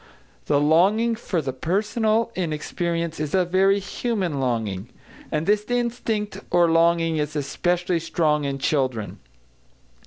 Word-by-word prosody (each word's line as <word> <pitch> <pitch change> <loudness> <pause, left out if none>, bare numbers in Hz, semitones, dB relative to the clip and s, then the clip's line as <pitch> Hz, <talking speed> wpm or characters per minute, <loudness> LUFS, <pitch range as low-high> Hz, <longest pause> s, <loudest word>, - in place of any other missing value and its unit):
The 145 - +3
longing 190 +10 +3
for 185 -7 -2
the 130 - -3
personal 215 - 0
in 175 -4 -2
experience 170 +1 -3
is 155 +3 -2
a 185 -1 +3
very 190 +3 +3
human 195 - -2
longing. 110 -5 -2 0.4
And 155 +1 -1
this 210 +2 +2
instinct 225 -4 -2
or 175 -1 +4
longing 165 -1 +3
is 150 0 -2
especially 175 +5 0
strong 155 -2 0
in 140 -1 -2
children. 130 -7 -1
170 Hz, 130 wpm, -23 LUFS, 150-200 Hz, 0.4 s, or